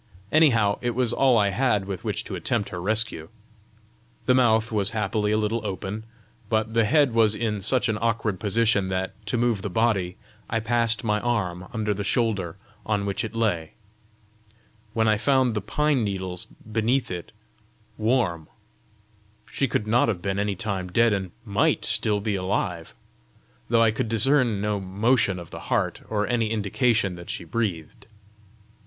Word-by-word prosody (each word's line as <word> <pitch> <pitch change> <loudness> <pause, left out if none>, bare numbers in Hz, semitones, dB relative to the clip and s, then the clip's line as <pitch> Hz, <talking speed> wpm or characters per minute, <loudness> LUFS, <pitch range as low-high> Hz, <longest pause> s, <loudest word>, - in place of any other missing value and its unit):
Anyhow 115 -10 +4
it 120 -1 -1
was 125 -2 +1
all 130 -3 +4
I 100 -2 +3
had 105 -1 +1
with 95 -2 -5
which - - -2
to - - -8
attempt 100 - -1
her 90 - -5
rescue! 105 -5 0 1.0
The 130 - +4
mouth 110 -3 +3
was 105 -2 +1
happily 105 0 0
a 110 - +2
little 110 +1 -1
open; 100 +2 -5 0.4
but 110 0 0
the 115 -1 +3
head 140 +2 +3
was 110 -2 +4
in 105 -3 -2
such 125 +6 +2
an 110 -1 -1
awkward 115 -4 0
position 105 -1 +2
that, 95 0 -2
to 110 - 0
move 115 -4 +1
the 100 - -3
body, 95 -3 0 0.3
I 115 - 0
passed 115 +1 +1
my 105 -2 +1
arm 95 -7 -2
under 110 -2 -1
the 100 0 -4
shoulder 100 -6 0 0.3
on 105 -2 -1
which 100 -1 -1
it 110 0 -6
lay, 90 -9 -1 1.2
when 110 0 +2
I 110 -1 +3
found 130 0 +2
the 105 - -2
pine 145 +4 +1
needles 95 -3 -3
beneath 115 +4 -1
it 90 -1 -6 0.6
warm: 110 -9 0 1.0
she 135 - 0
could 110 -2 -1
not 115 +3 +3
have 105 -6 -1
been 95 +1 -1
any 100 -1 0
time 95 -2 -3
dead, 115 +2 +4
and 95 -2 -2 0.2
MIGHT 100 -1 +1
still 105 -1 +2
be 105 +1 -2
alive, 90 -3 -2 0.7
though 115 0 +4
I 115 - +4
could 110 +1 -2
discern 115 -1 +2
no 105 -1 -1
motion 100 +2 +1
of 85 -2 -9
the - - -7
heart, - - 0
or 105 -1 0
any 115 -1 0
indication 110 -1 +1
that 85 0 -10
she - - -4
breathed! 85 -3 -4
110 Hz, 170 wpm, -25 LUFS, 100-115 Hz, 1.2 s, Anyhow